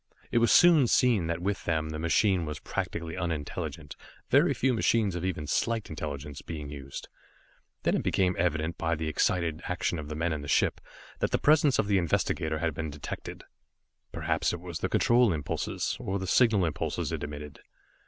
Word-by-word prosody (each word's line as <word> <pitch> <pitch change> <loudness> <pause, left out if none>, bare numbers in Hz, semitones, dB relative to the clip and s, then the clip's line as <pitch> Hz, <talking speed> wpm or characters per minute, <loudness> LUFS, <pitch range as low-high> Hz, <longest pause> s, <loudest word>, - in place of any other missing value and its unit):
It 120 - +3
was 115 -1 +3
soon 165 -7 +7
seen 115 -9 +3
that 85 +1 -3
with 100 +1 -2
them 80 -2 0
the 80 0 -5
machine 90 +3 +2
was 75 -1 -4
practically 80 +2 -4
unintelligent, 80 -4 -4 0.4
very - - +5
few 130 0 +1
machines 110 -3 +2
of 90 0 -4
even 90 -5 -2
slight 115 +8 -1
intelligence 75 -2 -6
being 75 -3 -7
used. 70 -2 -8 0.8
Then - - +2
it - - +1
became 90 -2 +1
evident 80 -1 0
by 80 0 0
the 80 0 -3
excited 80 +1 0
action 90 -1 -1
of 75 -1 -7
the 75 - -4
men 80 +1 0
of 75 - -4
the 75 - -8
ship, - - +2 0.4
that - - +1
the - - +1
presence 150 -3 +4
of 110 - +2
the 100 -2 +2
investigator 80 -2 0
had 80 0 -1
been 80 +2 -4
detected. 75 0 -7 0.7
Perhaps - - 0
it 85 - -4
was 85 -2 -6
the - - -1
control 120 -2 +4
impulses, 75 -4 -2
or 95 +1 -2
the 95 - -4
signal 105 -2 +4
impulses 80 - -2
it - - -3
emitted. 75 0 -7
85 Hz, 185 wpm, -28 LUFS, 75-100 Hz, 0.8 s, soon